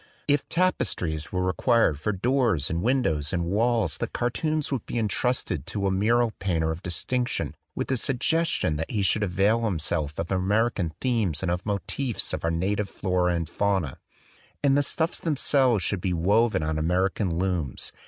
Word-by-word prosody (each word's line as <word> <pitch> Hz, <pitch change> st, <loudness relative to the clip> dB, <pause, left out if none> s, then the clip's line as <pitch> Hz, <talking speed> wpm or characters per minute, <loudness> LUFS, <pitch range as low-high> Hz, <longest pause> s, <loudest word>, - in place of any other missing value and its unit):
If 145 Hz, -1 st, +1 dB
tapestries 95 Hz, -, 0 dB
were 90 Hz, 0 st, -1 dB
required 95 Hz, -, +2 dB
for 105 Hz, -, -1 dB
doors 105 Hz, -, +1 dB
and 85 Hz, +1 st, -1 dB
windows 95 Hz, -, +1 dB
and 85 Hz, -2 st, 0 dB
walls 110 Hz, -1 st, +1 dB
the -, -, -1 dB
cartoons 155 Hz, +5 st, -1 dB
would 130 Hz, -6 st, -1 dB
be -, -, -3 dB
entrusted 105 Hz, -, -1 dB
to 100 Hz, -2 st, -2 dB
a 95 Hz, -, +2 dB
mural 115 Hz, +4 st, +2 dB
painter 80 Hz, -4 st, 0 dB
of 80 Hz, +2 st, -5 dB
distinction 120 Hz, +7 st, -2 dB, 0.2 s
with -, -, -2 dB
the 130 Hz, -, +1 dB
suggestion 135 Hz, -, +1 dB
that 80 Hz, -, -3 dB
he 105 Hz, -3 st, -1 dB
should 95 Hz, +3 st, +2 dB
avail 105 Hz, +4 st, +2 dB
himself 80 Hz, -6 st, -1 dB
of 85 Hz, +2 st, -3 dB
American 100 Hz, -1 st, +1 dB
themes 110 Hz, -, 0 dB
and 90 Hz, -, 0 dB
of 90 Hz, +4 st, -3 dB
motives 115 Hz, +4 st, -2 dB
from -, -, -2 dB
our 85 Hz, -, 0 dB
na 85 Hz, +5 st, 0 dB
tive 105 Hz, -2 st, -2 dB
flora 90 Hz, -2 st, 0 dB
and 85 Hz, -1 st, -2 dB
fauna; 95 Hz, -6 st, -1 dB, 0.6 s
and 140 Hz, -1 st, +4 dB
the 145 Hz, -, +4 dB
stuffs 160 Hz, +4 st, 0 dB
themselves 135 Hz, -, +2 dB
should 95 Hz, +2 st, -1 dB
be 90 Hz, -1 st, 0 dB
woven 100 Hz, +2 st, +2 dB
on 80 Hz, 0 st, -1 dB
American 90 Hz, +2 st, 0 dB
looms. 90 Hz, -8 st, -2 dB
100 Hz, 175 wpm, -26 LUFS, 85-120 Hz, 0.6 s, and